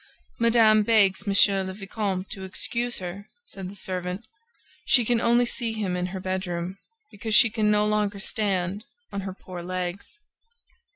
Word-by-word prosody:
"Madame 225 -2 +5
begs 205 -4 +3
Monsieur 195 0 +4
le 190 0 -5
Vicomte 195 -2 -3
to 195 -2 -7
excuse 235 +5 -1
her," 190 +3 -7 0.2
said 195 - -7
the 200 - -11
servant. 185 +2 -4 0.6
"She 245 -3 +4
can 235 0 +2
only 240 +1 +4
see 235 -1 -2
him 205 -5 -2
in 180 0 -1
her 190 +1 -5
bedroom, 185 0 -3 0.3
because 215 +1 -1
she 230 - +7
can 215 -1 +1
no 210 0 +3
longer 210 -1 0
stand 195 -1 -1 0.3
on 200 - -2
her 190 -1 -5
poor 180 -2 -9
legs." 185 - -5
200 Hz, 160 wpm, -25 LUFS, 185-220 Hz, 0.6 s, she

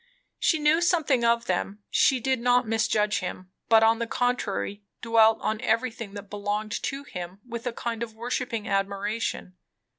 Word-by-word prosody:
She 320 - +3
knew 305 +2 +3
something 310 -8 +2
of 235 0 +3
them. 195 +3 -2
She 265 - +4
did 260 +1 0
not 245 0 +3
misjudge 215 -1 +1
him; 185 0 -6 0.2
but 225 -1 +6
on 225 +1 +4
the 235 - -2
contrary 230 -5 -1 0.2
dwelt 225 -1 +4
on 215 0 -1
everything 230 -2 -1
that 205 0 -8
belonged 205 +1 -3
to 275 +1 -3
him 180 -6 -7
with 235 0 -5
a - - 0
kind 230 -1 -4
of 225 -2 -5
worshipping 235 -1 -3
admiration. 200 -1 -2
225 Hz, 160 wpm, -26 LUFS, 205-245 Hz, 0.2 s, but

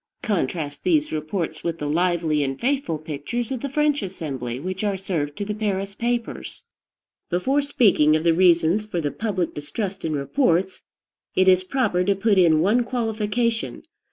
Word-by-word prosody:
Contrast 160 - -2
these 310 -4 +2
reports 155 +1 -3
with 165 -1 -2
the 150 - -4
lively 165 -1 +1
and 135 -1 -3
faithful 265 - 0
pictures 155 - -4
of 255 -3 -3
the 280 - -3
French 295 0 +1
Assembly 135 - -5
which 185 +5 -4
are 200 -2 0
served 160 -7 -3
to 205 - -3
the 210 - -2
Paris 200 -2 -2
papers. 235 +2 -3 0.7
Before 260 +12 +1
speaking 205 - +4
of 155 - 0
the 170 -1 +4
reasons 175 +2 +4
for 210 -5 -3
the 145 -3 -1
public 195 -6 -2
distrust 185 +7 -5
in 160 - -1
reports, 180 - +1 0.5
it 185 - +3
is 185 0 +5
proper 185 -4 +1
to 200 +2 +2
put 200 0 +2
in 160 -3 +5
one 215 +8 +3
qualification. 230 -1 -1
185 Hz, 165 wpm, -23 LUFS, 160-225 Hz, 0.7 s, is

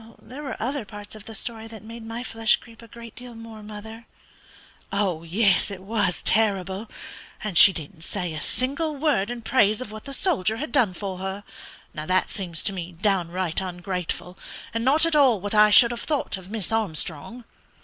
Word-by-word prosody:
"There 260 +6 -10
were 280 -3 -5
other 260 +3 -2
parts 205 0 -10
of 215 -1 -11
the 225 - -8
story 225 +1 -4
that 220 -1 -11
made 230 +1 -9
my 225 +2 -5
flesh 225 -2 +3
creep 230 -1 -15
a 230 - -13
great 235 0 -11
deal 245 -1 -10
more, 225 -1 -10
mother." 220 +2 -9 0.8
"Yes, 190 +1 +2
it 190 -2 -8
was 200 -3 0
terrible! 200 -1 +1 0.5
And 210 -4 -3
she 195 - +10
didn't 160 0 -8
say 180 -2 -3
a 155 - -4
single 285 +5 -2
word 275 -9 +1
in 240 -1 -5
praise 215 -3 +3
of 255 -4 -6
what 215 0 -9
the 275 - -6
soldier 240 - +2
had 305 +6 -4
done 230 -10 +2
for 190 -1 -5
her. 190 +2 -4 0.5
Now 155 0 -5
that 185 0 +2
seems 175 -5 -2
to 195 - 0
me 180 -1 -6
downright 180 -1 0
ungrateful, 180 0 -4 0.3
and 230 0 -1
not 290 +6 +5
at 330 -2 +1
all 265 -8 +5
what 205 +3 -4
I 210 0 +7
should 235 +3 +8
have 235 - -4
thought 295 -7 -1
of 190 -1 -10
Miss 220 -1 -4
Armstrong." 210 +1 -2
215 Hz, 190 wpm, -25 LUFS, 185-235 Hz, 0.8 s, she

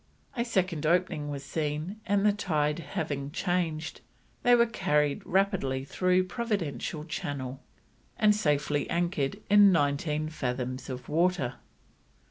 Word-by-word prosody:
A 235 - 0
second 185 -9 0
opening 170 -3 +1
was 140 -1 -5
seen, 155 +6 -3
and, 205 0 +2
the 210 - +5
tide 155 -6 0
having 140 -2 -3
changed, 165 -1 -2 0.4
they 245 -1 +6
were 235 0 +5
carried 150 -10 0
rapidly 175 -9 +1
through 185 +4 +2
Providential 185 - -3
Channel 135 -4 -4 0.6
and 210 -2 +4
safely 150 -5 0
anchored 170 -1 -1
in 205 -1 +7
nineteen 150 -1 +1
fathoms 130 -4 -3
of 130 -1 -6
water. 165 -5 +1
155 Hz, 120 wpm, -29 LUFS, 145-190 Hz, 0.6 s, in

